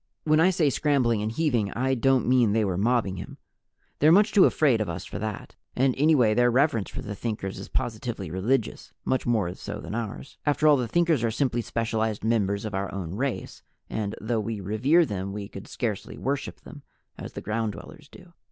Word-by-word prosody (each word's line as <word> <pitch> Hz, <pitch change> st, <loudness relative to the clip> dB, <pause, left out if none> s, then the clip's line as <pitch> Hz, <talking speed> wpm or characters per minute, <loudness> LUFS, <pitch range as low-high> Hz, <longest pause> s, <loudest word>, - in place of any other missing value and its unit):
When 155 Hz, 0 st, +3 dB
I 175 Hz, +3 st, +5 dB
say 165 Hz, -6 st, +2 dB
scrambling 125 Hz, -7 st, +1 dB
and 110 Hz, +1 st, -2 dB
heaving, 120 Hz, -7 st, 0 dB
I 130 Hz, +2 st, 0 dB
don't 130 Hz, +1 st, +2 dB
mean 120 Hz, -4 st, +4 dB
they 110 Hz, -1 st, +2 dB
were 95 Hz, -3 st, -1 dB
mobbing 105 Hz, -1 st, +1 dB
him. -, -, -8 dB, 0.6 s
They're 155 Hz, +2 st, +6 dB
much 205 Hz, +5 st, +5 dB
too 200 Hz, -3 st, +6 dB
afraid 130 Hz, -8 st, +3 dB
of 105 Hz, -, -2 dB
us 85 Hz, +2 st, -5 dB
for -, -, -6 dB
that, 105 Hz, -1 st, -5 dB, 0.2 s
and 130 Hz, +1 st, +3 dB
anyway 135 Hz, -7 st, +4 dB
their 120 Hz, +2 st, +4 dB
reverence 120 Hz, -4 st, +2 dB
for -, -, -7 dB
the 105 Hz, -, -5 dB
Thinkers 100 Hz, -3 st, -4 dB
is 95 Hz, -, -8 dB
positively 110 Hz, -, -3 dB
religious 110 Hz, +6 st, -1 dB
much 130 Hz, -, 0 dB
more 105 Hz, -7 st, +1 dB
so -, -, -7 dB
than -, -, -7 dB
ours. 115 Hz, +3 st, -6 dB
After 145 Hz, +1 st, +1 dB
all 150 Hz, -1 st, +6 dB
the 125 Hz, -2 st, -1 dB
Thinkers 165 Hz, -1 st, +2 dB
are 115 Hz, -, +2 dB
simply 120 Hz, +1 st, 0 dB
specialized 110 Hz, -2 st, -2 dB
members 105 Hz, -2 st, 0 dB
of 105 Hz, -, -5 dB
our 95 Hz, 0 st, -2 dB
own 90 Hz, -4 st, -5 dB
race, 130 Hz, +5 st, -3 dB, 0.3 s
and 105 Hz, -2 st, -2 dB
though 115 Hz, +1 st, -1 dB
we 110 Hz, 0 st, -3 dB
revere 125 Hz, -, +3 dB
them 100 Hz, -4 st, -4 dB
we 100 Hz, -1 st, -5 dB
could 100 Hz, -1 st, -10 dB
scarcely 110 Hz, -5 st, -4 dB
worship 140 Hz, +1 st, -3 dB
them, 145 Hz, -, -12 dB, 0.3 s
as -, -, -8 dB
the -, -, -6 dB
Ground 110 Hz, 0 st, -2 dB
Dwellers 150 Hz, +4 st, -12 dB
do. 180 Hz, -2 st, -16 dB
115 Hz, 205 wpm, -26 LUFS, 105-135 Hz, 0.6 s, They're